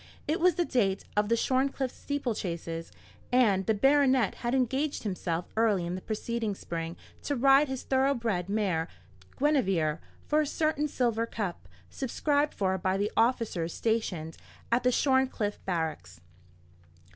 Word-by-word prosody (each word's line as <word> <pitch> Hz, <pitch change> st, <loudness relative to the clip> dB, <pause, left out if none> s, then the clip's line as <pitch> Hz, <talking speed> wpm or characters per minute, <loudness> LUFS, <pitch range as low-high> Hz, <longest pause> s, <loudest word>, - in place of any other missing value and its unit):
It 310 Hz, -, 0 dB
was 355 Hz, -1 st, +4 dB
the 350 Hz, -1 st, +1 dB
date 200 Hz, -9 st, +1 dB
of 210 Hz, 0 st, +1 dB
the 230 Hz, -, +4 dB
Shorncliffe 265 Hz, +1 st, 0 dB
steeple 285 Hz, -4 st, -3 dB
chases, 170 Hz, -3 st, -5 dB, 0.4 s
and 210 Hz, -7 st, +3 dB
the 220 Hz, -, +3 dB
baronet 265 Hz, -1 st, +4 dB
had 240 Hz, +2 st, 0 dB
engaged 265 Hz, +4 st, 0 dB
himself 180 Hz, -4 st, -2 dB
early 215 Hz, -5 st, +2 dB
in 175 Hz, -, -3 dB
the 185 Hz, -, -4 dB
preceding 220 Hz, 0 st, -3 dB
spring 165 Hz, -2 st, -5 dB, 0.2 s
to 285 Hz, -, -2 dB
ride 275 Hz, +3 st, +5 dB
his 265 Hz, -1 st, -4 dB
thorough 270 Hz, +1 st, +2 dB
bred 205 Hz, -7 st, -2 dB
mare 190 Hz, -6 st, 0 dB, 0.5 s
Guinevere, 195 Hz, -, +2 dB, 0.3 s
for 305 Hz, +1 st, +2 dB
a 300 Hz, -, -1 dB
certain 310 Hz, 0 st, 0 dB
silver 235 Hz, -4 st, 0 dB
cup, 190 Hz, -, -4 dB, 0.2 s
subscribed 290 Hz, +3 st, 0 dB
for 190 Hz, -1 st, 0 dB
by 185 Hz, +2 st, 0 dB
the 205 Hz, +2 st, -1 dB
officers 225 Hz, -8 st, +1 dB
stationed 185 Hz, -8 st, -1 dB, 0.3 s
at 235 Hz, +2 st, +3 dB
the 250 Hz, -, +3 dB
Shorncliffe 260 Hz, -6 st, +1 dB
barracks. 155 Hz, -, -3 dB
230 Hz, 145 wpm, -29 LUFS, 185-265 Hz, 0.5 s, ride